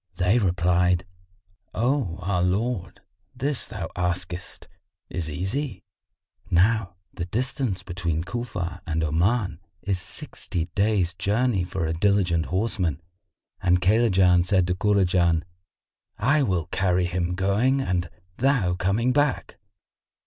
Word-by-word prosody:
They 95 Hz, +7 st, +3 dB
replied, 90 Hz, -2 st, +2 dB, 0.7 s
"O 120 Hz, -, 0 dB
our 90 Hz, -1 st, 0 dB
lord, 95 Hz, +2 st, -1 dB, 0.3 s
this 140 Hz, 0 st, -1 dB
thou 100 Hz, -6 st, -5 dB
askest 90 Hz, 0 st, -3 dB, 0.4 s
is 85 Hz, -2 st, -3 dB
easy." 95 Hz, -, -3 dB, 0.7 s
Now 95 Hz, 0 st, +2 dB, 0.2 s
the 85 Hz, -, -4 dB
distance 120 Hz, -, -2 dB
between 85 Hz, -4 st, -2 dB
Cufa 110 Hz, -6 st, -4 dB
and 80 Hz, 0 st, 0 dB
Oman 85 Hz, +3 st, +1 dB, 0.2 s
is 95 Hz, -2 st, -1 dB
sixty 85 Hz, 0 st, -5 dB
days' 100 Hz, -4 st, +1 dB
journey 105 Hz, +1 st, +1 dB
for 90 Hz, -1 st, -3 dB
a 80 Hz, -, -1 dB
diligent 90 Hz, -2 st, +2 dB
horseman, 90 Hz, -6 st, -1 dB, 0.6 s
and 90 Hz, 0 st, +3 dB
Kaylajan 95 Hz, -3 st, +4 dB
said 95 Hz, 0 st, +2 dB
to 90 Hz, -, 0 dB
Kurajan, 90 Hz, -4 st, +2 dB, 0.7 s
"I 140 Hz, +8 st, +3 dB
will 90 Hz, -, 0 dB
carry 90 Hz, -1 st, +2 dB
him 90 Hz, 0 st, -1 dB
going 105 Hz, +9 st, +2 dB
and 90 Hz, -8 st, -1 dB, 0.3 s
thou 125 Hz, -9 st, +2 dB
coming 100 Hz, +7 st, +1 dB
back." 145 Hz, -1 st, 0 dB
90 Hz, 115 wpm, -25 LUFS, 90-110 Hz, 0.7 s, Kaylajan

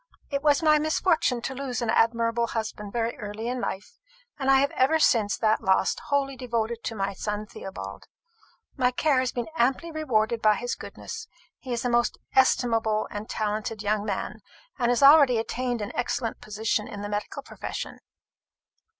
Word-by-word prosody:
"It 280 Hz, 0 st, 0 dB
was 295 Hz, +1 st, +3 dB
my 305 Hz, -1 st, +5 dB
misfortune 310 Hz, -4 st, +1 dB
to 265 Hz, -, -3 dB
lose 265 Hz, -3 st, -3 dB
an 235 Hz, -2 st, 0 dB
admirable 230 Hz, 0 st, +2 dB
husband 215 Hz, -3 st, -4 dB
very 235 Hz, +1 st, -1 dB
early 210 Hz, +1 st, -5 dB
in 250 Hz, 0 st, -2 dB
life; 195 Hz, -1 st, -5 dB, 0.4 s
and 270 Hz, -1 st, 0 dB
I 270 Hz, -, +7 dB
have 280 Hz, -, +2 dB
been -, -, -9 dB
ever 270 Hz, +5 st, +4 dB
since 225 Hz, -8 st, +3 dB
that 220 Hz, -1 st, +2 dB
loss 190 Hz, 0 st, +2 dB
wholly 275 Hz, -1 st, 0 dB
devoted 235 Hz, -2 st, -2 dB
to 225 Hz, -, -3 dB
my 195 Hz, -1 st, -2 dB
son 210 Hz, +2 st, -3 dB
Theobald. 100 Hz, -, -8 dB, 0.7 s
My 250 Hz, -2 st, +3 dB
care 270 Hz, +2 st, +2 dB
has 255 Hz, -1 st, 0 dB
been 240 Hz, -1 st, -3 dB
amply 270 Hz, +6 st, +1 dB
rewarded 235 Hz, -7 st, 0 dB
by 215 Hz, -1 st, +5 dB
his 245 Hz, +3 st, -3 dB
goodness. 450 Hz, 0 st, -8 dB, 0.3 s
He 255 Hz, -, -8 dB
is 240 Hz, 0 st, -2 dB
a -, -, +2 dB
most 240 Hz, 0 st, +2 dB, 0.2 s
estimable 225 Hz, -4 st, +2 dB
and 210 Hz, +1 st, -6 dB
talented 215 Hz, 0 st, -2 dB
young 210 Hz, 0 st, +1 dB
man, 210 Hz, +1 st, -3 dB, 0.4 s
and 240 Hz, -1 st, +2 dB
has 245 Hz, +3 st, +2 dB
already 280 Hz, -4 st, +8 dB
attained 240 Hz, 0 st, -2 dB
an 205 Hz, -, -5 dB
excellent 245 Hz, -1 st, -2 dB
position 215 Hz, 0 st, -1 dB
in 205 Hz, -, -7 dB
the -, -, -3 dB
medical 205 Hz, 0 st, -4 dB
profession." -, -, -6 dB
235 Hz, 175 wpm, -26 LUFS, 215-260 Hz, 0.7 s, already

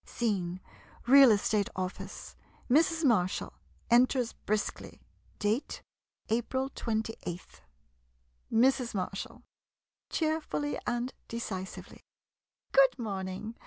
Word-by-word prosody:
ii -, -, -30 dB
Scene 185 Hz, -6 st, -1 dB, 0.2 s
— -, -, -24 dB
Real 275 Hz, -2 st, +10 dB
Estate 210 Hz, -1 st, +2 dB
Office. 185 Hz, 0 st, -6 dB, 0.4 s
Mrs. 325 Hz, +3 st, +3 dB
Marshall 185 Hz, -8 st, +1 dB, 0.4 s
enters 245 Hz, 0 st, +4 dB
briskly. 215 Hz, 0 st, -3 dB, 0.4 s
Date 215 Hz, +6 st, -1 dB, 0.5 s
April 260 Hz, +4 st, -1 dB
28th. 220 Hz, -7 st, -4 dB, 0.9 s
Mrs. 245 Hz, 0 st, +3 dB
Marshall 195 Hz, +1 st, -4 dB, 0.7 s
[Cheerfully 310 Hz, -2 st, -1 dB
and 240 Hz, +1 st, -1 dB
decisively.] 190 Hz, -5 st, -6 dB, 0.7 s
Good -, -, +5 dB
morn 200 Hz, -6 st, -3 dB
ing. 210 Hz, +5 st, -6 dB
230 Hz, 90 wpm, -30 LUFS, 200-265 Hz, 0.9 s, Real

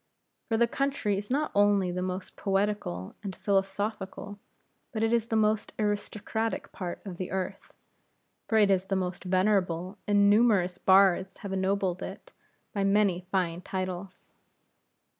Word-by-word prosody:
For 225 Hz, -, +2 dB
the 235 Hz, -, +5 dB
country 270 Hz, -5 st, -1 dB
is 200 Hz, +1 st, -5 dB
not 295 Hz, +4 st, 0 dB
only 200 Hz, -2 st, +3 dB
the 180 Hz, +1 st, -3 dB
most 185 Hz, 0 st, -4 dB
poetical 195 Hz, -, -1 dB
and 195 Hz, -3 st, -5 dB
philosophical, 200 Hz, +1 st, -2 dB, 0.5 s
but 220 Hz, -2 st, -2 dB
it 225 Hz, +1 st, +2 dB
is 230 Hz, -1 st, +2 dB
the 225 Hz, -, -1 dB
most 215 Hz, 0 st, +1 dB
aristocratic 215 Hz, +1 st, -2 dB
part 180 Hz, -3 st, -5 dB
of 185 Hz, -3 st, -6 dB
this 185 Hz, -, -4 dB
earth, 190 Hz, 0 st, -4 dB, 0.8 s
for 220 Hz, -, +2 dB
it 205 Hz, -2 st, +5 dB
is 190 Hz, -1 st, +2 dB
the 195 Hz, -, 0 dB
most 185 Hz, -1 st, -2 dB
venerable, 185 Hz, -1 st, +1 dB
and 205 Hz, -1 st, +4 dB
numerous 200 Hz, -4 st, +3 dB
bards 190 Hz, -1 st, +4 dB
have 195 Hz, -, -3 dB
ennobled 190 Hz, -1 st, 0 dB
it -, -, -8 dB, 0.4 s
by 200 Hz, -, 0 dB
many 195 Hz, -3 st, +2 dB
fine 180 Hz, -3 st, 0 dB
titles. 185 Hz, -1 st, -5 dB
195 Hz, 145 wpm, -28 LUFS, 185-210 Hz, 0.8 s, the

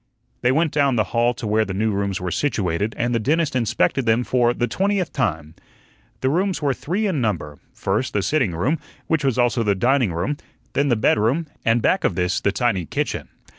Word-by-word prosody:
They 125 Hz, -, +3 dB
went 155 Hz, +3 st, +2 dB
down 140 Hz, -3 st, +2 dB
the 110 Hz, -, +3 dB
hall 120 Hz, +1 st, +2 dB
to 115 Hz, -, -6 dB
where 110 Hz, +1 st, +2 dB
the 95 Hz, -3 st, -5 dB
new 110 Hz, +2 st, +1 dB
rooms 100 Hz, -1 st, -1 dB
were 90 Hz, -1 st, -3 dB
situated, 105 Hz, -, -1 dB
and 120 Hz, +1 st, 0 dB
the 115 Hz, -, +2 dB
dentist 150 Hz, +5 st, +1 dB
inspected 125 Hz, +1 st, +1 dB
them 115 Hz, +2 st, +3 dB
for 120 Hz, -1 st, +2 dB
the 120 Hz, -, 0 dB
twentieth 195 Hz, +1 st, 0 dB
time. 80 Hz, -, -2 dB, 0.7 s
The 130 Hz, -, +2 dB
rooms 185 Hz, +3 st, 0 dB
were 145 Hz, -3 st, +1 dB
three 185 Hz, -, -2 dB
in 175 Hz, -9 st, 0 dB
number 80 Hz, -, -2 dB
first, 105 Hz, +7 st, -2 dB
the 100 Hz, -, 0 dB
sitting 130 Hz, -, +1 dB
room, 135 Hz, -, 0 dB, 0.3 s
which 160 Hz, -2 st, 0 dB
was 135 Hz, -3 st, +1 dB
also 120 Hz, -1 st, +2 dB
the 105 Hz, -3 st, +2 dB
dining 120 Hz, +1 st, +2 dB
room; 90 Hz, -, -2 dB, 0.4 s
then 145 Hz, -, +1 dB
the 120 Hz, -, +3 dB
bedroom, 115 Hz, +8 st, +2 dB, 0.2 s
and 115 Hz, 0 st, +2 dB
back 190 Hz, -, +2 dB
of -, -, +1 dB
this 90 Hz, 0 st, 0 dB
the 100 Hz, -, +2 dB
tiny 95 Hz, -7 st, 0 dB
kitchen. -, -, -2 dB
120 Hz, 210 wpm, -22 LUFS, 100-140 Hz, 0.7 s, They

